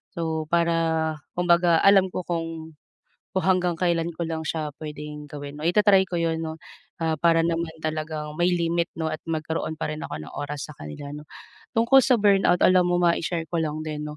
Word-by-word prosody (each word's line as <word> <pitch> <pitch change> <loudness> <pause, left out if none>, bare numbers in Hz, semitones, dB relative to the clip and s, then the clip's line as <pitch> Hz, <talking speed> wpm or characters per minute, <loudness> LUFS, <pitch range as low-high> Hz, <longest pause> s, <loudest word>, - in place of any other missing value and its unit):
so 160 -2 -2
para 165 -2 +1 0.2
kumbaga 170 -1 +4
alam 195 -1 +6
ko - - -2
kung 165 -1 -4 0.6
kung 190 - 0
hanggang 180 -2 +2
kailan 170 -1 +1
ko 170 - -2
lang 160 -1 -3
siya 155 -1 -2
puwedeng 150 -1 -7
gawin. 145 0 -8
Oh, - - -1
i-ta-try 200 +1 +5
ko 175 - -3
'yon 165 -1 0
'no, 160 0 -4 0.5
ah, 160 -1 +1
para 165 +1 +4
naman 165 0 -1
talagang 155 -1 -3
may 175 +1 +3
limit 170 0 0
'no, 160 - -1
at 155 - -5
magkaroon 160 0 -2
pa 160 - -2
rin 155 - -6
ako 80 - -5
ng - - -11
oras 145 0 -4
sa - - -11
kanila 75 - -8
'no. 150 0 -9 0.5
Tungkol 235 +4 +6
sa 255 - +4
burnout, 195 -3 +4
alam 185 -1 +5
mo 175 0 +2
ma-i-share 170 -1 +1
ko 170 - 0
lang 155 0 -3
din 150 -1 -4
'no, 150 - -8
165 Hz, 195 wpm, -25 LUFS, 155-175 Hz, 0.6 s, alam